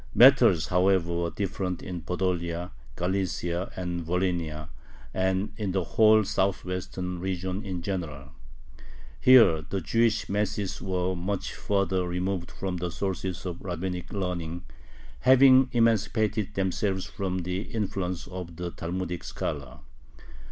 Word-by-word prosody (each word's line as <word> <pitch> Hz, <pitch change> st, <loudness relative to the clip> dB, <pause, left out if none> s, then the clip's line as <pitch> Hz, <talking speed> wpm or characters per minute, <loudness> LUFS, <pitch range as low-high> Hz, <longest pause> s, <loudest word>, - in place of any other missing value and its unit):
Matters, 80 Hz, -2 st, +6 dB
however, 90 Hz, -1 st, +2 dB
were 85 Hz, 0 st, 0 dB
different 95 Hz, -2 st, -3 dB
in 90 Hz, -2 st, -5 dB
Podolia, 90 Hz, -1 st, -2 dB, 0.2 s
Galicia, 90 Hz, -1 st, -1 dB
Volhynia, 85 Hz, -3 st, -2 dB, 0.4 s
and 95 Hz, +2 st, 0 dB
in 100 Hz, -4 st, -2 dB
the 95 Hz, -1 st, +1 dB
whole 110 Hz, +4 st, +5 dB
southwestern 90 Hz, -2 st, -2 dB
region 95 Hz, +2 st, -3 dB
in 90 Hz, -3 st, -4 dB
general. 75 Hz, -8 st, -4 dB, 0.9 s
Here 115 Hz, -11 st, +7 dB
the 95 Hz, +6 st, -3 dB
Jewish 115 Hz, +5 st, +1 dB
masses 105 Hz, -1 st, -2 dB
were 95 Hz, -1 st, -1 dB
much 95 Hz, +3 st, -3 dB
further 95 Hz, -2 st, 0 dB
removed 90 Hz, 0 st, -2 dB
from 95 Hz, -2 st, -4 dB
the 90 Hz, 0 st, -2 dB
sources 95 Hz, 0 st, -3 dB
of 90 Hz, -2 st, -5 dB
rabbinic 90 Hz, 0 st, -4 dB
learning, 90 Hz, -3 st, -3 dB, 0.5 s
having 130 Hz, 0 st, +6 dB
emancipated 110 Hz, -3 st, +1 dB
themselves 95 Hz, 0 st, 0 dB
from 95 Hz, -2 st, -3 dB
the 90 Hz, +2 st, -2 dB
influence 95 Hz, -5 st, -3 dB
of 90 Hz, -2 st, -7 dB
the 90 Hz, +1 st, -4 dB
Talmudic 90 Hz, 0 st, -4 dB
scholar. 65 Hz, -3 st, -5 dB
90 Hz, 115 wpm, -27 LUFS, 85-100 Hz, 0.9 s, Here